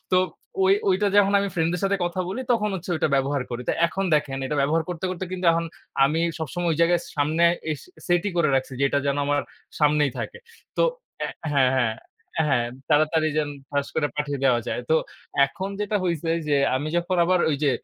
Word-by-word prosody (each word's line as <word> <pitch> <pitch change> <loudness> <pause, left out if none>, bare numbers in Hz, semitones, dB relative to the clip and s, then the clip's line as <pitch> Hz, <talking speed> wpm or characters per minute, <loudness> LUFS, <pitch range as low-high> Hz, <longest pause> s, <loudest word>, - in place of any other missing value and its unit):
তো 185 - +4 0.5
ঐ - - +4 0.2
ঐটা 190 +2 +2
যখন 200 0 +5
আমি 200 - -1
ফ্রেন্ড 165 -1 +1
দের 180 - -2
সাথে 200 0 +2
কথা 175 +1 -2
বলি 230 +7 -3
তখন 210 -2 +1
হচ্ছে 180 0 -5
ওইটা 155 - +1
ব্যবহার 135 0 +1
করি। 120 0 -4
তো - - +3
এখন 195 +3 -3
দেখেন 135 -2 0
এটা 150 - -2
ব্যবহার 160 +4 +2
করতে, 180 +1 -4
করতে, 185 +1 -4
কিন্তু 180 -1 -2
এখন 165 0 0 0.4
আমি 155 +4 +1 0.2
সবসময় 170 +3 -2
ওই - - -2
জায়গায় 170 +1 +4 0.2
সামনে 155 +4 +2 0.3
এস 150 - -3 0.3
সেট 175 -1 +2
ই - - -3
করে 170 -3 +3
রাখছি 130 0 0
যে - - +4
এটা 140 - +1
যেন 140 0 +1
আমার 145 0 +1 0.4
সামনেই 150 -2 +3
থাকে। 475 - -5 0.4
তো - - +3 0.4
অ্যা - - -1 0.2
হ্যাঁ, 130 -2 +4
হ্যাঁ, 120 -4 +1 0.5
হ্যাঁ, 120 -4 +2 0.2
তাড়াতাড়ি 155 +1 +3
যেন 150 -1 0 0.2
ঠাস 140 -1 0
করে 150 -2 +1
পাঠিয়ে 145 -2 -2
দেওয়া 120 -3 +4
যায়। - - -2
তো - - +5 0.5
এখন 190 +6 -5
যেটা 210 0 0
হইছে 165 -2 -1 0.2
যে 145 - +3 0.2
আমি 145 +3 -3
যখন 175 +1 0
আবার 180 +1 +3
ওই 145 - +1
যে 140 - +4
160 Hz, 210 wpm, -24 LUFS, 145-180 Hz, 0.5 s, যখন